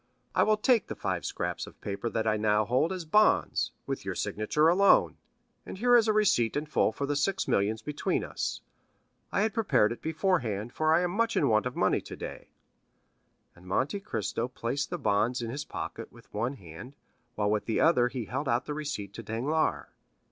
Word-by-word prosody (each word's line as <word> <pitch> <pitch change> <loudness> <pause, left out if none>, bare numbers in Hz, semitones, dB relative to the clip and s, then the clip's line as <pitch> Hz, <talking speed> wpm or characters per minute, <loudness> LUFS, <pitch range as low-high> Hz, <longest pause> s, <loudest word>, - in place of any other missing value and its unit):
I - - +3
will 215 0 +4
take 230 +1 +3
the - - -5
five - - -3
scraps - - -3
of - - -14
paper 100 +3 -4
that 110 -1 -2
I 110 -1 +2
now 105 0 +2
hold 130 - +1
as 185 -3 -4
bonds, 210 +7 +3
with - - -4
your - - -4
signature 130 +9 +1
alone, 195 +4 +4 0.5
and - - -8
here 245 +4 +4
is 230 -2 +5
a - - +4
receipt 190 - +2
in 150 - -2
full 150 - +1
for 140 - -3
the 145 +1 -1
six 190 +7 0
millions 110 +3 +1
between 150 +2 -1
us. - - -4 0.7
I - - +1
had 215 0 +1
prepared 135 - +2
it 120 - -6
beforehand, 150 - -1
for 155 0 +1
I 165 +2 +4
am 180 -1 0
much 230 +4 0
in 140 - +3
want 110 +2 +3
of 125 - -6
money - - +2
today." - - -8 1.1
And 90 +1 -17
Monte 135 - 0
Cristo 115 - -3
placed 130 +3 -3
the - - -3
bonds 110 +4 +1
in 115 -1 -4
his 145 +3 -5
pocket - - -6
with - - -19
one 120 +6 -1
hand, 95 - -11 0.4
while 105 -1 0
with 105 -1 0
the 115 - 0
other 125 -7 +4
he 125 -2 -4
held 135 +6 -3
out 120 +2 +1
the 150 - -4
receipt 145 -10 -5
to 115 - -7
Danglars. 125 +9 -1
130 Hz, 200 wpm, -29 LUFS, 110-165 Hz, 1.1 s, is